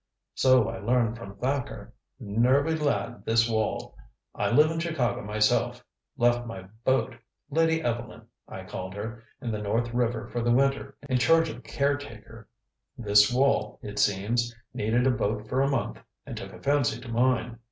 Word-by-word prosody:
"So 130 -3 +4
I - - -5
learned 115 +1 +1
from 100 -4 -9
Thacker. 130 +3 -3 0.3
Nervy 130 +9 +2
lad, 140 -6 -1
this 115 +1 +3
Wall. 110 -2 -2 0.4
I - - -1
live 155 +2 +5
in 165 - -2
Chicago 130 -8 -1
myself 105 0 +1 0.3
left 120 0 +2
my 95 -5 -7 0.2
boat 130 0 +1 0.4
Lady 160 +1 +2
Evelyn, 120 -2 -3 0.2
I - - -8
called 95 +1 -6
her 110 +3 -6 0.2
in 120 - -2
the 105 -1 -3
North 115 +3 -1
River 120 -1 0
for 120 - -3
the 120 - 0
winter 135 +3 +1
in 130 -2 +1
charge 165 +4 +4
of - - -7
a - - -12
caretaker. 115 -4 -3 0.5
This 105 -1 +5
Wall, 135 +3 +1
it 105 -1 -5
seems, 115 +4 +1 0.2
needed 115 +4 +1
a 130 - +4
boat 110 -3 -2
for 130 - 0
a 140 - +2
month 135 -4 -2 0.3
and - - -7
took - - -7
a - - -13
fancy 140 -5 +1
to 125 - -11
mine. 120 -1 0
120 Hz, 170 wpm, -27 LUFS, 110-135 Hz, 0.5 s, live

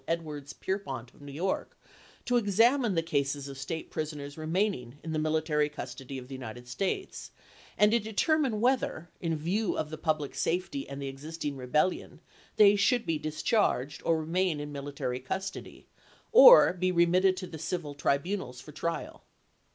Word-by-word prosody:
Edwards 155 -4 -3
Pierrepont 135 - -4
of - - -20
New 145 0 -9
York 175 +7 -3 0.5
to 245 - +1
ex 205 -5 0
Feu. 225 - +8
27,1863. 240 +3 +6
amine 230 -7 0
the 165 - +1
cases 140 -3 -1
of 140 - -8
state 160 +5 -5
prisoners 150 -2 -5
remaining 160 - -1
in 160 - -5
the 155 - 0
military 155 -1 +1
custody 135 -2 -7
of 125 -1 -8
the 135 - -9
United 125 -1 -8
States, 195 - -3 0.5
and 210 0 +5
to 235 - +4
de 220 0 -7
termine 270 -1 +1
whether, 240 -9 0
in 165 -2 -1
view 185 +8 -1
of 150 - -3
the 155 - -6
public 155 -3 -1
safety 185 - -2
and 140 - -6
Morgan - - -6
the 140 - -3
existing 145 +1 -5
rebellion, 145 +7 -1 0.4
they 205 -1 +7
should 240 +4 +2
be 165 -3 -1
discharged, 155 - 0
or 165 - +2
"Memoirs 160 -1 -1
remain 175 -1 0
in 145 0 -6
military 140 -3 -4
custody, 190 +9 -6 0.5
or - - +9
be 185 0 0
remitted 180 +2 +3
to 185 - -4
the 165 - -8
°*i)ix/'^" - - -9
civil 160 -4 -3
tribunals 140 -1 -1
for 135 +4 -11
trial. 165 +3 -4
160 Hz, 180 wpm, -29 LUFS, 140-190 Hz, 0.5 s, or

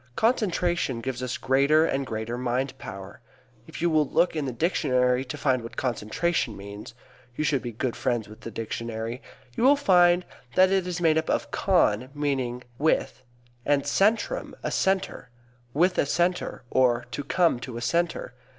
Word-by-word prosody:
Concentration 175 - +1
gives 130 +1 -4
us 125 -1 -3
greater 140 +4 +3
and 135 -3 -1
greater 110 +2 -3
mind 125 +2 -2
power. 100 0 -9 0.5
If - - -7
you 175 - +3
will 155 -3 +2
look 175 - +2
in 150 -2 -1
the 130 - -2
dictionary 125 -3 +1
to 135 +3 -6
find 130 -3 +1
what 115 - -10
concentration 125 +2 -1
means 100 +3 -9 0.4
(you 155 - -1
should 145 -3 +1
be 120 - -5
good 115 +2 -3
friends 120 -5 -1
with 110 +1 -13
the - - -6
dictionary) 115 +1 -5 0.3
you - - -1
will 275 +3 +7
find 180 -9 +4 0.3
it 185 0 +6
is 180 -2 0
made 160 -2 +4
up 160 - -5
of - - -1
con 130 - +2
meaning 130 -4 -2 0.2
with, 150 -3 +1 0.4
and 140 +1 +2
centrum, 220 - +1
a - - -2
center, 190 -9 0 0.4
"with 180 +7 +2
a - - +2
center," 175 +4 0
or 120 -2 +3
"to 145 - -4
come 165 -2 +2
to 120 -1 -7
a - - -5
center." 170 - -1
135 Hz, 170 wpm, -26 LUFS, 120-175 Hz, 0.5 s, will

